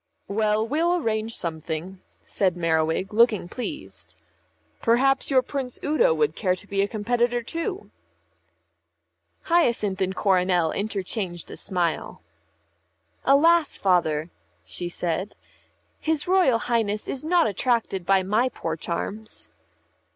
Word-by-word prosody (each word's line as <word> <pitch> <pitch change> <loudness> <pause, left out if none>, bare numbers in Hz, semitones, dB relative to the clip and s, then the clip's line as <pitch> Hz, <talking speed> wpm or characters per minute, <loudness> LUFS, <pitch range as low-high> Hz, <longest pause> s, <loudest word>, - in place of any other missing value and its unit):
"Well, 215 +1 +1
we'll 330 +7 +2
arrange 225 -7 -1
something," 165 +3 -5 0.2
said 185 -3 0
Merriwig, 165 +3 0
looking 220 -5 +3
pleased. 95 - -7 0.7
"Perhaps 265 +4 +3
your 260 -2 +4
Prince 260 -1 -4
Udo 465 +12 +3
would 450 -2 +1
care 185 -3 +1
to 185 - -11
be 200 -1 0
a 200 - +1
competitor 240 +3 0
too." 365 - -4 1.5
Hyacinth 235 - +1
and 190 0 0
Coronel 180 -4 +2
interchanged 195 -3 -3
a - - -7
smile. 170 - -2 1.0
"Alas, 320 +4 +4
Father," 170 -4 +1 0.3
she 175 -1 -4
said, 175 +3 -3 0.6
"his 315 -1 -1
Royal 360 -10 +4
Highness 225 -3 -1
is 265 - -4
not 340 0 +3
attracted 220 -3 0
by 190 +1 +3
my 215 +7 +2
poor 165 -9 -4
charms." 205 +7 -4
210 Hz, 115 wpm, -25 LUFS, 180-255 Hz, 1.5 s, your